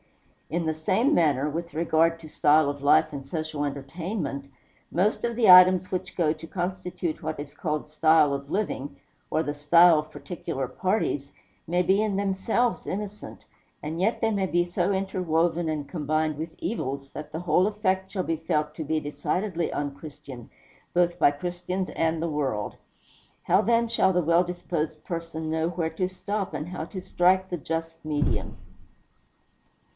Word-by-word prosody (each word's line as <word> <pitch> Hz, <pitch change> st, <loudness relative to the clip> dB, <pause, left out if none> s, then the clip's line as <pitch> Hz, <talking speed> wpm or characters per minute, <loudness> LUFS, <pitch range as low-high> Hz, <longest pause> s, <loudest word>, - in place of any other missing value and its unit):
In 170 Hz, 0 st, -1 dB
the 160 Hz, -, +1 dB
same 190 Hz, -, +1 dB
manner, 145 Hz, -4 st, +3 dB
with 165 Hz, +1 st, -4 dB
regard 165 Hz, 0 st, +2 dB
to 160 Hz, -, -11 dB
style 150 Hz, 0 st, +3 dB
of 145 Hz, 0 st, -5 dB
life 145 Hz, +1 st, +4 dB
and 135 Hz, -1 st, -6 dB
social 155 Hz, 0 st, -3 dB
entertainment 140 Hz, +1 st, -4 dB, 0.4 s
most 195 Hz, +5 st, +1 dB
of 235 Hz, -1 st, -1 dB
the 225 Hz, -4 st, +3 dB
items 185 Hz, 0 st, +8 dB
which 185 Hz, 0 st, -4 dB
go 160 Hz, -4 st, +3 dB
to 160 Hz, +1 st, -11 dB
constitute 180 Hz, -2 st, -3 dB
what 155 Hz, -1 st, -3 dB
is 145 Hz, 0 st, -7 dB
called 150 Hz, -1 st, -2 dB
style 155 Hz, -1 st, +4 dB
of 140 Hz, 0 st, -5 dB
living, 185 Hz, -8 st, -3 dB, 0.3 s
or 160 Hz, -, +1 dB
the 145 Hz, -, -2 dB
style 160 Hz, +3 st, +6 dB
of 155 Hz, 0 st, -6 dB
particular 135 Hz, -6 st, -5 dB
parties, 145 Hz, -, -1 dB, 0.4 s
may 175 Hz, +2 st, +2 dB
be 190 Hz, +4 st, +3 dB
in 210 Hz, -3 st, 0 dB
themselves 200 Hz, +5 st, 0 dB
innocent, 210 Hz, +1 st, -6 dB, 0.4 s
and 160 Hz, +3 st, -3 dB
yet 220 Hz, +5 st, +1 dB
they 225 Hz, -1 st, +2 dB
may 195 Hz, -2 st, 0 dB
be 175 Hz, -1 st, +2 dB
so 175 Hz, +2 st, 0 dB
interwoven 175 Hz, -3 st, 0 dB
and 150 Hz, -2 st, -3 dB
combined 155 Hz, -1 st, -1 dB
with 160 Hz, +2 st, -6 dB
evils, 140 Hz, -, -3 dB
that 150 Hz, -, -8 dB
the 160 Hz, -, -4 dB
whole 180 Hz, +2 st, +3 dB
effect 190 Hz, -3 st, -1 dB
shall 190 Hz, -3 st, -1 dB
be 165 Hz, -, -1 dB
felt 150 Hz, -1 st, -1 dB
to 160 Hz, -, -4 dB
be 155 Hz, +1 st, 0 dB
decidedly 170 Hz, +4 st, -2 dB
unchristian, 145 Hz, -3 st, -6 dB, 0.5 s
both 175 Hz, 0 st, +2 dB
by -, -, +6 dB
Christians 180 Hz, +4 st, -4 dB
and 160 Hz, 0 st, 0 dB
the 170 Hz, -, -1 dB
world. 135 Hz, -9 st, -2 dB, 0.7 s
How, 195 Hz, -, +4 dB
then, 235 Hz, +1 st, +2 dB
shall 225 Hz, -5 st, +3 dB
the 180 Hz, -1 st, +1 dB
well 170 Hz, +3 st, +4 dB
disposed 170 Hz, -3 st, -4 dB
person 165 Hz, -2 st, -4 dB
know 160 Hz, +1 st, 0 dB
where 165 Hz, -2 st, -2 dB
to 180 Hz, +3 st, -1 dB
stop, 195 Hz, +1 st, -4 dB
and 155 Hz, -, -4 dB
how 175 Hz, -3 st, -5 dB
to 185 Hz, +2 st, -7 dB
strike 185 Hz, +1 st, +2 dB
the 175 Hz, -, -2 dB
just 165 Hz, +1 st, -4 dB
medium? 150 Hz, -1 st, -1 dB
165 Hz, 170 wpm, -26 LUFS, 150-185 Hz, 0.7 s, items